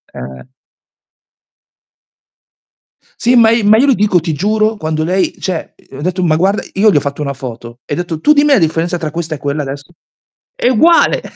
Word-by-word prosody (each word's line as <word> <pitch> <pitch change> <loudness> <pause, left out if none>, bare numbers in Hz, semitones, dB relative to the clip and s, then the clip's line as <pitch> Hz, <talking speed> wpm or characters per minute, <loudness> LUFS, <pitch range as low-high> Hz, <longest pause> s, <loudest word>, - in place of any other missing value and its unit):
Eh. 65 +1 -9 2.8
Sì, 245 +1 +2
ma 225 -2 +5
i 230 -1 +1
ma 210 +2 +5
io 255 - +3
lo 275 - +4
dico, 205 -5 +2
ti 165 -1 -3
giuro, 215 +6 0
quando 155 -4 -3
lei 185 +4 0
cioè 180 -4 -5 0.2
ho 135 - -8
detto, 180 +3 -2
ma 160 -3 +2
guarda, 190 +5 0
io 210 +3 +3
le 195 - +3
ho - - +5
fatto 140 +1 -5
una 140 -1 -3
foto. 120 -2 -9
E 145 - -3
detto, 170 -1 -4
tu 300 - +4
dimmi 295 0 +3
la - - +5
differenza 165 +1 -1
tra 160 -3 -5
questa 165 0 -4
e - - -9
quella 145 +2 -3
adesso. 140 +3 -8 0.6
È - - -1
uguale. 325 +8 +3
170 Hz, 190 wpm, -14 LUFS, 150-215 Hz, 2.8 s, ma